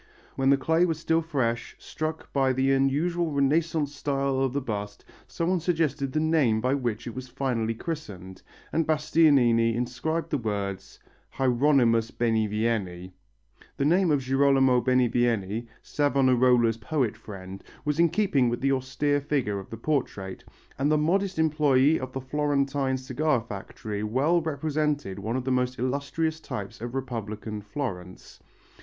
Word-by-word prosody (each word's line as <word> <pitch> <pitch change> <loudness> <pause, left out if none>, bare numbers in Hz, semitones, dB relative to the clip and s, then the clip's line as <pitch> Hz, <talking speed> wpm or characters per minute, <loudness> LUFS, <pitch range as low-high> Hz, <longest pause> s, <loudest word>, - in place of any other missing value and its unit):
When 135 0 +2
the 140 - +5
clay 160 +6 +2
was 165 -3 -1
still 165 0 +1
fresh, 130 -8 -2
struck 155 0 -5
by 135 -2 +2
the 135 +1 +2
unusual 155 +6 +1
Renaissance 150 +1 +1
style 140 -2 -1
of 135 -1 +1
the 140 - -1
bust, 105 -5 -5 0.2
someone 175 +2 -1
suggested 155 -5 0
the 155 - 0
name 155 -9 +2
by 125 +4 +1
which 120 -5 -2
it 120 - -6
was 130 0 -7
finally 120 -3 -2
christened, 100 - -7 0.3
and 165 -1 +1
Bastianini 140 -7 +3
inscribed 130 +7 -2
the 145 - +1
words: 100 -4 -4 0.4
HIER^{MUS} 125 -3 +2
BENIVIENI. 105 -5 -1 0.6
The 140 - 0
name 175 +4 +3
of 145 -3 +2
Girolamo 135 -1 +3
Benivieni, 120 -3 +1 0.2
Savonarola's 125 -5 +3
poet 120 -1 -1
friend, 95 -3 -10 0.2
was 150 +1 -1
in 170 0 +5
keeping 150 - +2
with 120 - -2
the 135 0 +2
austere 135 +2 0
features 135 -9 -1
of - - -21
the 115 - -7
portrait, 110 -8 -3 0.4
and 145 +2 +2
the 155 - +4
modest 190 +5 +1
employé 150 -2 +3
of 130 0 -6
the 135 - -5
Florentine 140 -1 0
cigar 130 +2 0
factory 105 -1 -6
well 135 +11 +2
represented 150 -7 -2
one 110 +4 -3
of 130 - -1
the 130 - -2
most 125 0 0
illustrious 140 +5 -1
types 100 -9 -7
of 120 +2 -5
Republican 110 -4 -5
Florence. 100 -5 -6
130 Hz, 145 wpm, -26 LUFS, 115-150 Hz, 0.6 s, the